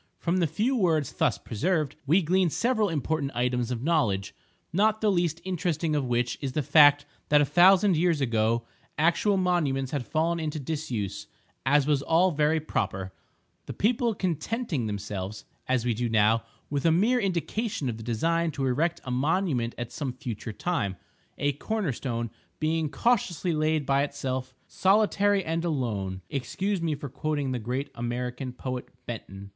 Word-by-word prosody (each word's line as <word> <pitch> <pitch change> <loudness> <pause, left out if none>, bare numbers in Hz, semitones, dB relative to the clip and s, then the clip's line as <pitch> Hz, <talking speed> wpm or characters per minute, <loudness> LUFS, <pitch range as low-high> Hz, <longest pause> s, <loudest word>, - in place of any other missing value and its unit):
From 175 +2 0
the 175 -3 +2
few 215 - 0
words 165 - +1
thus - - +1
preserved, 155 - -1
we 175 +6 +4
glean 180 +2 +2
several 220 - +1
important 150 -2 -1
items 125 -1 0
of 125 -1 -3
knowledge, 115 -12 +1 0.4
not 215 +4 +3
the 215 -1 +2
least 175 -3 0
interesting 170 -4 -1
of 140 -3 0
which 120 0 0
is 135 -3 -3
the 150 - 0
fact 145 +1 +6 0.2
that 150 - +6
a 145 - +4
thousand 185 +5 +5
years 165 -1 +2
ago 115 -2 +1 0.3
actual 170 +6 +3
monuments 155 -8 +1
had 145 -4 -1
fallen 165 +7 0
into 155 -1 -3
disuse—as 135 - -2
was 145 -2 +2
all 170 +5 +3
very 155 +1 +2
proper—the 95 -10 -6
people 235 +1 +1
contenting 185 - -2
themselves, 100 -1 -5 0.2
as 130 -2 +1
we 120 - +2
do 120 +2 -2
now, 110 +1 +3 0.3
with 140 -2 -1
a - - +5
mere 220 +10 +3
indication 200 - -2
of 115 -3 -3
the - - -9
design 165 +9 0
to 140 -3 -2
erect 155 +7 0
a 125 - -5
monument 135 -3 0
at 120 0 -5
some 135 -1 -4
future 120 -3 -6
time; 105 - -2 0.4
a 145 - +1
corner 205 +3 -2
stone 115 -2 -3 0.3
being 155 0 0
cautiously 190 -5 +1
laid 155 -1 +1
by 140 +1 +2
itself 130 -2 -3
"solitary 200 0 +2
and 165 +1 -1
alone" 105 - -2
(excuse 185 - -2
me 160 -2 0
for 145 - -6
quoting 145 0 -2
the 125 - -2
great 125 +5 -3
American 125 +2 -3
poet 125 0 -5 0.2
Benton!) 100 -4 -7
145 Hz, 160 wpm, -27 LUFS, 125-175 Hz, 0.4 s, fact